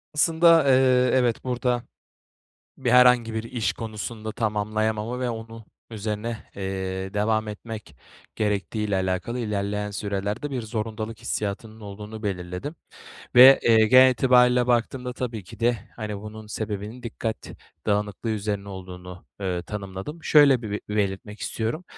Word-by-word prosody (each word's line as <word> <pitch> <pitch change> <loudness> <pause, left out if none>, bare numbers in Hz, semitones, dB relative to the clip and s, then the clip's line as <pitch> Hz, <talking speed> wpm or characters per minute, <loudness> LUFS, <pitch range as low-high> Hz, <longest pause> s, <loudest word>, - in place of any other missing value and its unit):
Aslında, 165 +1 +5
eee, 130 -1 +4
evet, 125 -3 +2
burada 125 -1 -1 1.0
bir - - 0
herhangi 125 -2 +5
bir 110 - -2
iş 115 -1 -1
konusunda 110 0 -6
tamamlayamama 110 +2 -1
ve 125 -1 0
onun 115 0 -8 0.3
üzerine, 110 +1 -3 0.2
eee, 95 0 -4
devam 110 +1 +1
etmek 110 +1 -8 0.4
gerektiği 105 +1 -1
ile 100 - +1
alakalı 95 +6 -2
ilerleyen 105 -2 -2
sürelerde 100 +6 -3
bir 130 -3 -3
zorundalık 110 0 -4
hissiyatının 110 0 -4
olduğunu 105 +1 -8
belirledim 90 - -4 0.6
ve, 130 +2 +10
eee, 110 -1 +5
genel 130 +3 +8
itibariyle 125 0 +4
baktığımda 125 +1 0
tabii 120 -5 -5
ki - - -13
de, 120 0 +2 0.2
hani, 105 -3 -5
bunun 110 +1 -9
sebebinin 105 +2 -5
dikkat 115 -1 -3 0.5
dağınıklığı 105 +1 -1
üzerine 100 -1 -3
olduğunu, 90 -1 -9 0.2
eee, 90 -3 -2
tanımladım. 100 - -7
Şöyle 140 -5 +6
bir 105 -2 -4
belirtmek 105 0 -2
istiyorum: 115 +10 -3
110 Hz, 130 wpm, -25 LUFS, 105-120 Hz, 1.0 s, ve